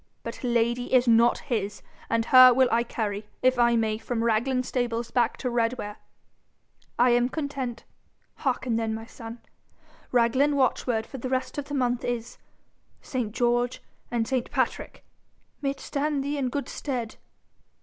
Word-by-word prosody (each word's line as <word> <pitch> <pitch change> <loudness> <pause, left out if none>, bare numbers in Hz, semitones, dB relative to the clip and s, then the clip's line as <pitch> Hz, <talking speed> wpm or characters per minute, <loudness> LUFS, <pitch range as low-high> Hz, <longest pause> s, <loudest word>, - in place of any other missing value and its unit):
But - - -7
Lady 240 0 0
is 255 -1 +4
not 235 +1 +5
his, 210 -7 -3 0.3
and 230 0 +1
her 255 0 +9
will 260 0 +5
I 230 - +3
carry, 210 -3 -3 0.2
if 255 -1 +3
I 235 0 +4
may, 220 -1 0
from 230 -1 -2
Raglan 240 +3 +1
stables 240 -2 -2
back 240 -2 +1
to 255 - -4
Redware.' 230 -3 -1 1.0
'I 245 +1 +5
am 240 +1 +3
content. 270 -5 -4 0.5
Hearken 255 -4 -1
then, 225 -1 -1
my 225 0 -7
son. 230 0 -10 0.7
Raglan 255 +4 +3
watchword 245 -4 +1
for 270 - -9
the 255 - -4
rest 260 +2 -2
of 285 - -5
the 285 - -5
month 245 -2 0
is 240 -1 -4 0.6
ST. 245 -5 -3
GEORGE 240 +1 +1 0.3
AND 230 -2 -1
ST. 255 -3 -1
PATRICK! - - -2 0.6
May 275 - 0
it 275 - -5
stand 285 -1 -1
thee 285 +1 -2
in 260 -2 0
good 280 +3 -3
stead.' 245 -6 -4
245 Hz, 160 wpm, -26 LUFS, 230-255 Hz, 1.0 s, her